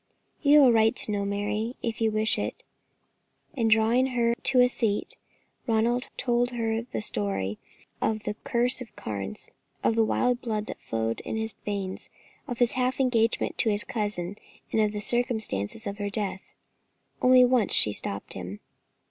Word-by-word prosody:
"You 295 0 +7
have 265 - +7
a - - +6
right 225 -1 +4
to - - 0
know, 200 -1 -1
Mary, 205 +4 -2
if 230 -1 -3
you 225 - +3
wish 215 +1 +1
it;" - - -4 0.9
and 230 -5 +1
drawing 225 +4 +4
her 235 -2 +1
to 255 +2 +2
a 250 - +7
seat, 225 -4 -1 0.5
Ronald 235 +2 +1
told 245 -1 +1
her 225 -2 -1
the - - -2
story 100 - -2 0.4
of 215 -1 0
the - - -2
Curse 245 +2 +2
of 250 - -6
the - - -24
Carnes, 100 -2 -6 0.4
of - - +3
the 225 0 +3
wild 245 +2 +1
blood 215 -3 -2
that - - -8
flowed 115 0 -2
in - - -5
his 220 0 -2
veins, 195 -2 -4 0.4
of 245 -3 -4
his 240 -1 +3
half 255 +1 -1
engagement 230 -4 +1
to 225 - +3
his 205 -1 +1
cousin, 205 -3 -3 0.3
and 220 - +2
of 210 -1 +2
the 210 0 -4
circumstances 220 - -1
of 200 +1 -5
her 205 0 -2
death. 200 -2 -3 0.8
Only 255 0 +7
once 245 -4 +2
she 105 - +4
stopped 100 -1 -3
him. 95 +2 -7
220 Hz, 175 wpm, -27 LUFS, 205-245 Hz, 0.9 s, You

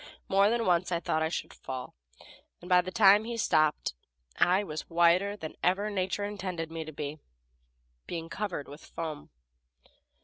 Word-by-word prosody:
More 195 +1 +4
than 235 0 +1
once 180 0 +2
I 170 - +1
thought 160 -1 -1
I 160 - +1
should - - -4
fall, 130 -1 -7 0.7
and 175 - -12
by 180 -1 +6
the 180 - -6
time 205 +1 +6
he 235 +1 -4
stopped 155 -8 +2 0.4
I 185 +3 +3
was 155 -5 -6
whiter 175 +4 +3
than 160 -5 -6
even 200 +4 +1
nature 190 +1 -1
intended 180 -5 -4
me 165 0 -4
to 155 - -8
be, 150 +1 -5 0.9
being 165 -1 -4
covered 180 -5 -4
with 145 +3 -11
foam. 155 -3 -6
180 Hz, 165 wpm, -29 LUFS, 160-200 Hz, 0.9 s, by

